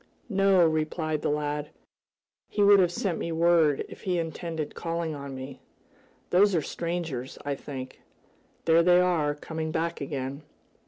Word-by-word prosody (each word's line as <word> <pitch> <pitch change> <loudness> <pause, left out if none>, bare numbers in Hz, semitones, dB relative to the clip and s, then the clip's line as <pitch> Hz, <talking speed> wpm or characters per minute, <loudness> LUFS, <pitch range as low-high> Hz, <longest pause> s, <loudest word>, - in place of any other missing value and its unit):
"No," 195 -3 +4
replied 155 0 -1
the - - 0
lad. 150 0 -2 0.8
"He 205 - +1
would 200 0 +7
have 180 -2 +3
sent 175 -1 -2
me 170 - -3
word 165 -3 +3
if - - -12
he 180 -2 -1
intended 165 -1 -4
calling 165 -1 -3
on 140 -2 -7
me. 130 +1 -8 0.7
Those 195 +2 +5
are 165 - +2
strangers, 165 -7 -4
I 145 - 0
think. 130 -2 -8 0.6
There 165 +1 +5
they 175 +1 +5
are, 165 -5 +2
coming 160 +1 -5
back 165 0 -2
again." 140 0 -4
160 Hz, 150 wpm, -27 LUFS, 145-175 Hz, 0.8 s, would